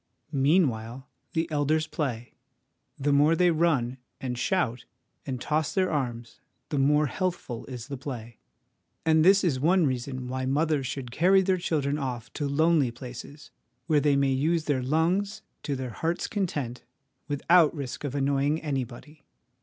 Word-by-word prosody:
Meanwhile, 135 Hz, -4 st, +1 dB, 0.3 s
the 165 Hz, 0 st, 0 dB
elders 155 Hz, +1 st, +1 dB
play; 125 Hz, -7 st, -4 dB, 0.6 s
the 145 Hz, 0 st, +1 dB
more 150 Hz, +3 st, +5 dB
they 180 Hz, +1 st, +4 dB
run, 145 Hz, -7 st, +1 dB, 0.2 s
and 125 Hz, -2 st, -3 dB
shout, 125 Hz, -4 st, -1 dB, 0.4 s
and 130 Hz, -2 st, -3 dB
toss 155 Hz, -, -1 dB
their 185 Hz, -1 st, +2 dB
arms, 120 Hz, -6 st, -3 dB, 0.3 s
the 145 Hz, -, -1 dB
more 150 Hz, +2 st, +4 dB
healthful 150 Hz, -7 st, -3 dB
is 125 Hz, -2 st, -7 dB
the 140 Hz, -1 st, -5 dB
play. 120 Hz, -4 st, -7 dB, 0.7 s
And 160 Hz, -1 st, +4 dB
this 195 Hz, +3 st, +6 dB
is 150 Hz, -8 st, +1 dB
one 170 Hz, +4 st, +3 dB
reason 130 Hz, -1 st, -3 dB
why 130 Hz, +1 st, -3 dB
mothers 145 Hz, 0 st, +1 dB
should 130 Hz, -3 st, -5 dB
carry 190 Hz, +8 st, +4 dB
their 190 Hz, 0 st, +2 dB
children 150 Hz, -4 st, 0 dB
off 125 Hz, -4 st, -5 dB
to 145 Hz, -, -2 dB
lonely 155 Hz, -1 st, +3 dB
places, 125 Hz, +4 st, -10 dB, 0.3 s
where 150 Hz, +1 st, +3 dB
they 145 Hz, -1 st, +3 dB
may 140 Hz, -1 st, +2 dB
use 155 Hz, +5 st, +1 dB
their 140 Hz, -3 st, +1 dB
lungs 180 Hz, +10 st, 0 dB, 0.2 s
to 145 Hz, -, -2 dB
their 130 Hz, -2 st, -4 dB
hearts' 165 Hz, +7 st, -2 dB
content 145 Hz, -, -3 dB, 0.5 s
without 155 Hz, +3 st, +4 dB
risk 140 Hz, -3 st, -5 dB
of 145 Hz, -2 st, -3 dB
annoying 140 Hz, +2 st, +1 dB
anybody. 140 Hz, 0 st, -5 dB
145 Hz, 155 wpm, -27 LUFS, 130-160 Hz, 0.7 s, this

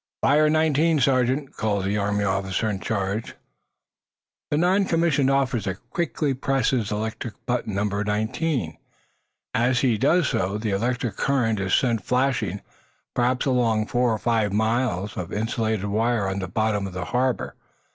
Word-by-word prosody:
"Fire 150 Hz, +2 st, +4 dB
nineteen, 155 Hz, 0 st, +3 dB
Sergeant," 130 Hz, +1 st, +1 dB
calls 100 Hz, -3 st, -1 dB
the 100 Hz, +2 st, 0 dB
Army 105 Hz, 0 st, 0 dB
officer 95 Hz, +2 st, -1 dB
in 100 Hz, -3 st, -2 dB
charge. 100 Hz, 0 st, -3 dB, 1.1 s
The 145 Hz, -, +1 dB
non 185 Hz, +4 st, +3 dB
commissioned 165 Hz, -6 st, +2 dB
officer 125 Hz, -8 st, 0 dB, 0.2 s
quickly 150 Hz, -3 st, -1 dB
presses 130 Hz, -4 st, 0 dB
electric 110 Hz, +1 st, -4 dB
button 120 Hz, -4 st, -2 dB
numbered 100 Hz, +1 st, -1 dB
nineteen. 110 Hz, -, -1 dB, 0.7 s
As 125 Hz, 0 st, +2 dB
he 120 Hz, -5 st, +2 dB
does 160 Hz, +4 st, +3 dB
so 95 Hz, +2 st, -1 dB
the 110 Hz, -1 st, -2 dB
electric 120 Hz, +1 st, -1 dB
current 120 Hz, -6 st, +1 dB
is 95 Hz, -1 st, +1 dB
sent 115 Hz, -5 st, +1 dB
flashing, 125 Hz, -7 st, 0 dB, 0.5 s
perhaps 125 Hz, +1 st, +1 dB
along 115 Hz, -5 st, +2 dB
four 120 Hz, +2 st, +1 dB
or 110 Hz, -, 0 dB
five 110 Hz, -2 st, +1 dB
miles 110 Hz, -2 st, 0 dB
of 85 Hz, -, -5 dB
insulated 110 Hz, -1 st, -1 dB
wire 110 Hz, +1 st, +1 dB
on 95 Hz, +1 st, -2 dB
the 95 Hz, -, -3 dB
bottom 105 Hz, +1 st, 0 dB
of 95 Hz, -, -9 dB
the 90 Hz, -1 st, -4 dB
harbor. 125 Hz, +3 st, -1 dB
115 Hz, 145 wpm, -24 LUFS, 100-130 Hz, 1.1 s, Fire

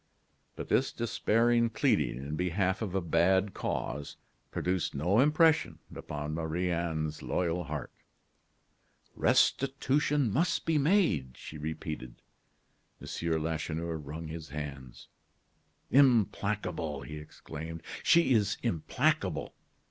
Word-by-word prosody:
But -, -, -7 dB
this -, -, +2 dB
despairing 115 Hz, +1 st, +2 dB
pleading 110 Hz, -, +1 dB
in 70 Hz, +4 st, -5 dB
behalf 90 Hz, +3 st, 0 dB
of 100 Hz, -4 st, -3 dB
a 95 Hz, -, +1 dB
bad 95 Hz, +4 st, +2 dB
cause 70 Hz, +4 st, -4 dB, 0.3 s
produced 90 Hz, -4 st, -1 dB
no 90 Hz, +10 st, +2 dB
impression 155 Hz, +3 st, +4 dB, 0.2 s
upon 75 Hz, 0 st, -5 dB
Marie 85 Hz, +3 st, -1 dB
Anne's 80 Hz, -3 st, -2 dB
loyal 90 Hz, -1 st, -1 dB
heart. 75 Hz, -3 st, -5 dB, 1.2 s
"Restitution 140 Hz, -2 st, +2 dB
must 165 Hz, +7 st, +1 dB
be 160 Hz, -2 st, +2 dB
made," 140 Hz, -, +2 dB
she 75 Hz, -, -9 dB
repeated. 75 Hz, -4 st, -6 dB, 0.8 s
M. 80 Hz, -2 st, -2 dB
Lacheneur 80 Hz, +1 st, -2 dB
wrung 80 Hz, +2 st, -7 dB
his 80 Hz, -1 st, -7 dB
hands. 70 Hz, -3 st, -7 dB, 0.8 s
"Implacable!" 105 Hz, -, +2 dB
he 75 Hz, -, -7 dB
exclaimed; 80 Hz, +2 st, -8 dB, 0.2 s
"she 170 Hz, -6 st, +5 dB
is 105 Hz, -2 st, +2 dB
implacable. 85 Hz, -10 st, 0 dB
85 Hz, 105 wpm, -30 LUFS, 75-115 Hz, 1.2 s, she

